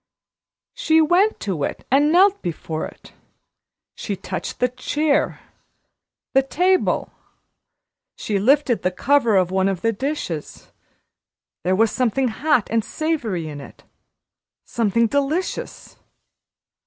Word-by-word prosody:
She 320 -11 +2
went 355 +7 +3
to 185 -8 -2
it - - -4
and 290 +3 +4
knelt 385 +3 +4
before 160 -2 -4
it. - - -16 0.8
She 205 - -4
touched 185 0 -6
the 250 - +3
chair, 290 +4 -1 0.9
the 270 - +5
table; 360 +7 +1 1.0
she 205 -2 -2
lifted 260 +2 +2
the 180 - +1
cover 235 +3 +2
of 185 -2 +2
one 190 0 +2
of 190 -3 -3
the 225 0 +1
dishes. 210 - -5 0.9
There 185 +1 +1
was 220 +2 +3
something 255 +1 0
hot 255 0 +1
and 225 -1 +1
savory 235 - -2
in 145 -2 -7
it - - -14 0.8
something 230 0 +1
delicious. 285 - -3
245 Hz, 115 wpm, -21 LUFS, 195-300 Hz, 1.0 s, the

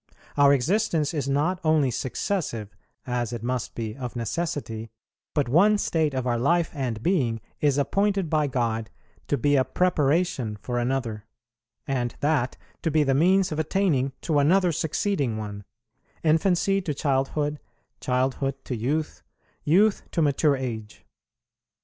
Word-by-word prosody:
Our 140 -1 +6
existence 160 - +1
is 140 -3 -2
not 155 +6 +1
only 155 -5 +3
successive, 120 - -3 0.3
as 120 -2 -2
it 120 -2 -5
must 125 0 -3
be 110 -2 -4
of 125 -2 -6
necessity, 120 -4 -3 0.5
but 145 -4 +2
one 195 +11 +5
state 160 -7 0
of 130 -1 -1
our 120 -2 0
life 170 +6 +2
and 125 -7 -3
being 130 -12 +1 0.2
is 145 -2 +2
appointed 195 +5 +1
by 150 -1 +1
God 115 -4 -1 0.4
to 145 - +1
be 145 +4 +2
a 130 - +4
preparation 155 -8 +1
for 120 +3 -2
another; 120 -4 -2 0.6
and 125 -3 -2
that 145 -4 0 0.2
to 165 - 0
be 155 0 +3
the 135 -2 +2
means 185 +6 +3
of 155 - -2
attaining 155 -5 +1
to 155 -3 +1
another 180 +5 +4
succeeding 150 - -1
one: 105 -2 -6 0.6
infancy 180 +4 +2
to 155 -6 -3
childhood, 145 +2 0 0.4
childhood 130 +1 0
to 125 - -3
youth, 145 +7 -2 0.4
youth 195 +7 +4
to 165 - +2
mature 145 0 +3
age. 110 -5 -6
140 Hz, 145 wpm, -25 LUFS, 125-160 Hz, 0.6 s, Our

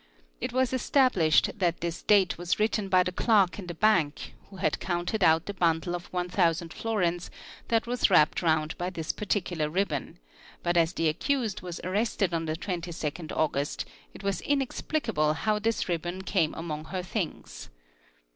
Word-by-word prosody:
It - - -3
v 255 - -4
as 260 -1 +2
established 240 - +3
that 175 -3 0
this 170 0 -3
date 200 -3 +4
was 175 +2 -1
written 210 -2 +1
by 185 -1 +5
the 180 - -2
clerk 200 -1 +3
in 185 - -7
the 175 - -5
bank 175 -7 +1 0.2
who 195 - -12
d 185 - +2
counted 175 +3 -1
out 160 0 +4
the 200 - -4
bundle 170 -2 +1
of 175 0 -7
1,000 175 -2 0
florins 180 -6 -1 0.4
that 230 -1 +2
was 245 -1 +1
wrapped 155 -5 +4
round 160 -2 +1
by 175 - -1
i - - -1
3 170 -3 -5
particular 175 -7 -1
ribbon, 160 -5 -2 0.5
but 175 0 +1
as 165 0 +3
the 165 - +1
accused 225 - -1
was 175 -2 -6
arrested 195 -1 0
on 165 -1 -1
the 155 0 -2
22nd 170 -3 -4 0.2
gust 140 +1 -2 0.3
it - - -11
was 200 -1 -1
inexplicable 270 - 0
how 210 +5 0
this 225 +1 0
ribbon 175 +2 -3
came 170 -5 +1
among 155 -2 -5
her 185 +2 -4
things. 175 - -5
180 Hz, 175 wpm, -28 LUFS, 165-205 Hz, 0.5 s, by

